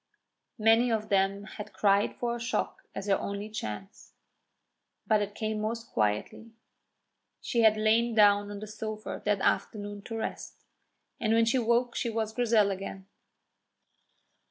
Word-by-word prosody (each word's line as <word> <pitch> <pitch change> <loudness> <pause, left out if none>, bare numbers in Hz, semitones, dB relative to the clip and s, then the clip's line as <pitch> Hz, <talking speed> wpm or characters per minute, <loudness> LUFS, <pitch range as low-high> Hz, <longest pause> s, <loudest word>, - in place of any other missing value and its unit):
Many 225 +2 +4
of 215 -1 -1
them 195 0 +2
had 210 0 -9
cried 200 0 +2
for 240 -1 -2
a - - -6
shock 250 +10 -2
as - - -4
her 200 -1 +2
only 200 +1 -4
chance. 195 - -7 0.9
But 215 -1 +3
it 205 0 -4
came 215 -1 -2
most 230 +2 -4
quietly. 105 - -1 0.9
She 235 - 0
had 220 -1 +5
lain 225 +2 +2
down 205 -1 +5
on 205 0 -7
the - - -5
sofa 215 0 -6
that 205 -2 +1
afternoon 205 0 -1
to 225 - -5
rest, 220 - -6 0.5
and 220 -1 +1
when 230 0 +4
she 245 +3 +2
woke 235 +1 +1
she 235 - -1
was 220 -1 -2
Grizel 220 -4 +3
again. 195 0 -6
215 Hz, 150 wpm, -29 LUFS, 205-230 Hz, 0.9 s, had